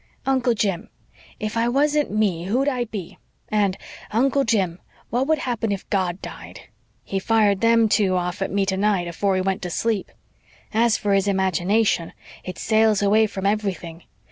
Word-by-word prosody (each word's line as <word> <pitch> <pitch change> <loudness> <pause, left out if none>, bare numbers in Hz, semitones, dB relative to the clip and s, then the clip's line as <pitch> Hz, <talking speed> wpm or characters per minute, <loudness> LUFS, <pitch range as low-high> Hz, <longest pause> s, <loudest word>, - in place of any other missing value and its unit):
'Uncle 260 -3 +2
Jim, 195 -5 -1 0.5
if 215 -1 -4
I 230 +1 +1
wasn't 295 +3 +2
ME 195 -5 0
who'd 250 +8 0
I 250 -4 0
be?' 205 -6 -8 0.3
and, 205 -3 +1 0.3
'Uncle 270 +5 +2
Jim, 190 -7 0 0.3
what 250 +3 0
would 315 0 +3
happen 235 -5 -2
if 195 -1 -4
God 185 -2 0
died?' - - -9 0.4
He 195 - -3
fired 205 -1 +2
them 230 -1 +4
two 200 -3 +2
off 180 +2 -2
at 195 - -1
me 200 0 0
tonight, 190 -1 +1
afore 190 +3 0
he 185 - +1
went 190 +1 -1
to 180 - -4
sleep. 215 +3 -1 0.6
As 230 0 +3
for 205 -2 0
his 195 0 +2
imagination, 190 -1 +1 0.3
it 185 - -7
sails 220 -2 +2
away 215 +2 +4
from 195 -1 -6
everything. 195 -5 -2
205 Hz, 170 wpm, -22 LUFS, 190-230 Hz, 0.6 s, them